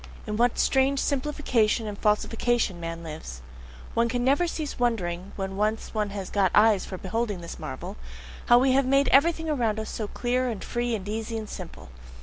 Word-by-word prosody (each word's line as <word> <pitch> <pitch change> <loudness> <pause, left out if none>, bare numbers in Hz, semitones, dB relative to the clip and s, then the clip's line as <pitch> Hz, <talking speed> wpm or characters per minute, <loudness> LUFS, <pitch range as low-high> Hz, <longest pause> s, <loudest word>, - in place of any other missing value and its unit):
In 210 - -3
what 240 +2 +2
strange 270 +1 +3
simplification 260 -6 +1
and 210 -1 -4
falsification 210 -1 +1
man 165 0 -5
lives! 155 - -8 0.5
One 235 0 +2
can 245 +1 -1
never 280 +7 +3
cease 310 -5 -4
wondering 190 -6 -1
when 195 -1 -4
once 215 +2 -1
one 210 -2 0
has 195 -2 -6
got 195 -2 +3
eyes 210 -2 +5
for 185 - -6
beholding 205 0 -2
this 170 - -8
marvel! 170 +5 -6 0.5
How 240 - +7
we 260 +2 +4
have 265 0 +3
made 275 +1 +3
everything 320 +3 +4
around 235 -8 0
us 220 +1 -5
clear 250 +1 0
and 220 -5 -5
free 240 -1 -1
and 200 -2 -6
easy 225 +2 -3
and 215 -1 -5
simple! 175 - -9
225 Hz, 180 wpm, -26 LUFS, 195-250 Hz, 0.5 s, How